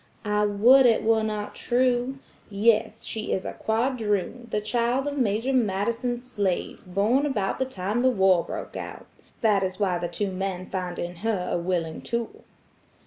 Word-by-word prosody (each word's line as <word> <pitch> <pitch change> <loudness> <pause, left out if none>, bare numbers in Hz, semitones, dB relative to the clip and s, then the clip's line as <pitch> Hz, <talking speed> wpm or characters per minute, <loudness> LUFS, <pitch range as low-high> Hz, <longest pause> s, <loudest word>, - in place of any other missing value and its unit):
"I 210 0 +2
would 245 +6 +6
it 230 - +3
were 220 0 +3
not 215 -1 -3
true. 250 +1 +1 0.3
Yes, 210 +2 +2
she 220 -1 -4
is 190 - -2
a - - -4
quadroon, 225 -1 -1
the 210 - 0
child 240 +5 0
of 290 0 -2
Major 240 0 0
Madison's 235 +2 0
slave, 205 -8 -2
born 210 +9 +2
about 205 -9 -1
the 260 - +1
time 210 -1 -2
the 260 - +4
war 190 -6 +4
broke - - -7
out. - - -7 0.4
That 210 -4 +3
is 185 0 -2
why 185 -4 +1
the 175 - -2
two 195 +3 -2
men 185 -1 -3
find 180 -2 -3
in 175 0 -5
her 195 -2 -1
a - - +1
willing 170 -2 -2
tool." 235 -1 -4
210 Hz, 170 wpm, -26 LUFS, 190-240 Hz, 0.4 s, would